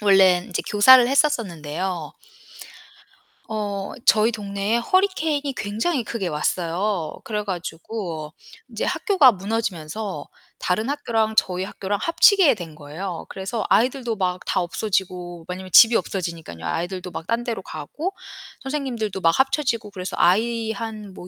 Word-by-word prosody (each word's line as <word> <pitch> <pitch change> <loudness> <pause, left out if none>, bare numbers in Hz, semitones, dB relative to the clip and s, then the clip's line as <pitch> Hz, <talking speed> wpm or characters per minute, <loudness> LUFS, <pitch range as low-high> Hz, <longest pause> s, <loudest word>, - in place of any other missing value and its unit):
원래는 190 -3 +4
인제 180 - -2
교사를 245 +4 +8
했었었는데요. 180 - -1 1.4
어 205 -2 -3
저희 220 +2 +5
동네에 200 0 -2
허리케인이 310 -2 +1
굉장히 230 +8 -1
크게 215 -4 -3
왔어요. 170 +3 -1
그래 210 -1 -3
가지고 170 -3 -5 0.4
인제 - - -4
학교가 365 - +4
무너지면서 195 -4 -4 0.3
다른 215 +7 -1
학교랑 225 -6 0
저희 185 -2 +2
학교랑 195 +1 -3
합치게 340 - +5
된 170 -6 -9
거예요. 165 +4 -6
그래서 195 +4 -4
아이들도 245 -1 +2
막 180 -2 0
다 - - 0
없어지고 180 -2 -3
왜냐면 185 +1 -6
집이 225 +5 +8
없어지니깐요. 170 - -3
아이들도 180 - -3
막 165 - -6
딴 230 +1 0
데로 230 -5 -3
가고 185 - -5 0.5
선생님들도 255 -8 -3
막 165 -1 +3
합쳐지고 265 -6 +1
그래서 185 -1 -6
아이 225 +4 +2
한 215 -2 -6
뭐 180 - -10
205 Hz, 325 characters per minute, -23 LUFS, 180-230 Hz, 1.4 s, 교사를